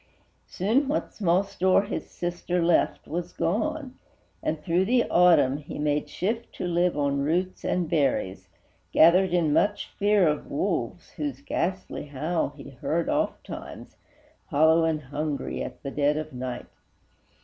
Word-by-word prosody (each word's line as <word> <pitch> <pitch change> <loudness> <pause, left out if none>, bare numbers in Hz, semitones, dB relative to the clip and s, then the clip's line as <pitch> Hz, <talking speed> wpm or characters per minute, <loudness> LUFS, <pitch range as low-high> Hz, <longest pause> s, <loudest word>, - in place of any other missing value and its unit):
Soon 230 +10 +1
what 290 - -2
small 185 -2 +2
store 190 0 +2
his 205 - -5
sister 175 0 -2
left 170 0 +2
was 175 +2 -4
gone, 265 - -2 0.4
And, 155 - -2
through 175 +4 +1
the 240 +3 +2
Autumn, 165 -6 +5
he 145 0 -8
made 150 0 0
shift 225 +5 -3
to - - -5
live 175 0 +1
On 140 -1 +1
roots 175 +6 -1
and 180 -2 0
berries, 140 - 0 0.4
gathered 180 +3 +5
in 170 -4 +2
much 205 +5 +1
fear 205 -3 +4
Of 150 -1 -1
wolves, - - -2
whose 290 -2 -4
ghastly 190 - -3
howl 155 +5 -1
he - - -10
heard - - -2
ofttimes, - - -4 0.5
Hollow 160 +3 +4
and 155 -2 -1
hungry, 145 +1 -3
at - - -7
the 140 - -4
dead 145 +1 +1
of 155 -1 -5
night. 125 -1 -5
170 Hz, 145 wpm, -26 LUFS, 150-190 Hz, 0.5 s, Autumn